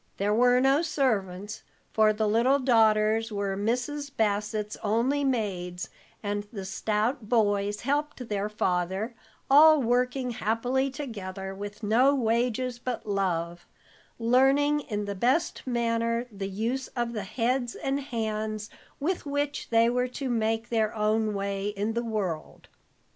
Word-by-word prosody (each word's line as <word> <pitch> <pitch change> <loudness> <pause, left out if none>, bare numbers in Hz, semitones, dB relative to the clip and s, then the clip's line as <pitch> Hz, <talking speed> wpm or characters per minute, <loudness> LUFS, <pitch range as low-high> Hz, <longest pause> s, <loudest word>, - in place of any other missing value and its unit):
There 205 +1 +1
were 245 +2 +4
no 270 +3 +4
servants, 215 - -1 0.3
for 215 -1 +5
the 215 0 0
little 235 +6 +3
daughters 225 -3 +3
were 200 -1 -2
Mrs. 250 +8 -2
Bassett's 210 -2 -1
only 235 +7 +1
maids, 190 -9 -2 0.3
and 205 0 -2
the 195 -4 -6
stout 215 +4 -1
boys 205 -3 +1
helped 285 -2 -2
their 205 -1 -2
father, 190 +2 -1 0.3
all 305 +2 +7
working 250 +1 0
happily 245 +4 0
together 200 -9 -6
with 205 +2 -8
no 250 +7 +4
wages 240 0 0
but 245 0 -4
love; 175 -4 -2 0.5
learning 270 +5 +3
in 210 -7 -4
the 200 - -3
best 260 - 0
manner 230 -1 0
the 195 -1 -5
use 230 +7 -2
of 240 -1 -1
the 215 - -3
heads 245 +4 -1
and 275 +1 -1
hands 220 -4 -3 0.3
with 330 +1 -2
which 285 0 -2
they 230 0 +4
were 250 +1 +1
to 260 +1 -5
make 225 0 0
their 220 -2 0
own 215 0 +1
way 200 0 -2
in 205 +2 -2
the 235 +1 -1
world. 200 -8 -4
225 Hz, 135 wpm, -27 LUFS, 205-255 Hz, 0.5 s, all